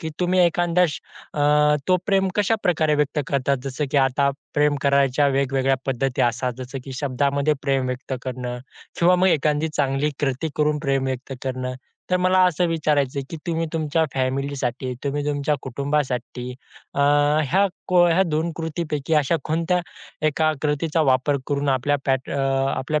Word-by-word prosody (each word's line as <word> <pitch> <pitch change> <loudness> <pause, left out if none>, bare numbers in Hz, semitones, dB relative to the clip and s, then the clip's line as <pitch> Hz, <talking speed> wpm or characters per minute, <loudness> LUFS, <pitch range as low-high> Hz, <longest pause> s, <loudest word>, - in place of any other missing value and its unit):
की 160 -3 -4
तुम्ही 180 +1 +2
एखादा 175 0 +3 0.5
अ, 150 0 +3
तो 185 - +5
प्रेम 195 -2 +2
कशाप्रकारे 185 -7 +2
व्यक्त 150 +1 0
करतात? 140 0 +1
जसं, 135 +2 -2
की - - 0
आता 140 +1 +3 0.2
प्रेम 145 0 +3
करायच्या 140 0 +3
वेगवेगळ्या 135 0 +1
पद्धती 135 0 0
असतात, 125 +1 0
जसं 130 +1 -6
की 135 - -7
शब्दामध्ये 140 +2 +1
प्रेम 135 -3 +1
व्यक्त 125 +1 -5
करणं 125 -1 -4 0.4
किंवा 180 +1 +5
मग 185 +1 +3
एखादी 150 0 +1
चांगली 140 +1 +1
कृती 140 +2 -1
करून 150 0 +1
प्रेम 135 -3 0
व्यक्त 130 0 -4
करणं. 130 -1 -3 0.4
तर 180 - +4
मला 185 +1 +3
असं 180 0 +1
विचारायचं, 145 -4 0
की 165 - -5
तुम्ही 165 -1 -1
तुमच्या 160 0 +1
फॅमिलीसाठी, 130 -1 -2
तुम्ही 145 +1 -1
तुमच्या 145 0 0
कुटुंबासाठी 130 -2 -2 0.5
अ, - - 0
ह्या 145 +5 +3 0.2
को 180 -1 +5
ह्या 170 +3 +4
2 165 -1 -1
कृतीपैकी 160 -2 -2
अशा 150 +2 +2
कोणत्या 165 +3 0 0.5
एका 155 +1 +2
कृतीचा 150 +2 0
वापर 130 +3 +2
करून 145 -1 -1
आपल्या 135 +2 +2
पॅट 130 0 0
अ, 140 - -2 0.4
आपल्या 150 +3 -1
145 Hz, 155 wpm, -23 LUFS, 135-160 Hz, 0.5 s, तो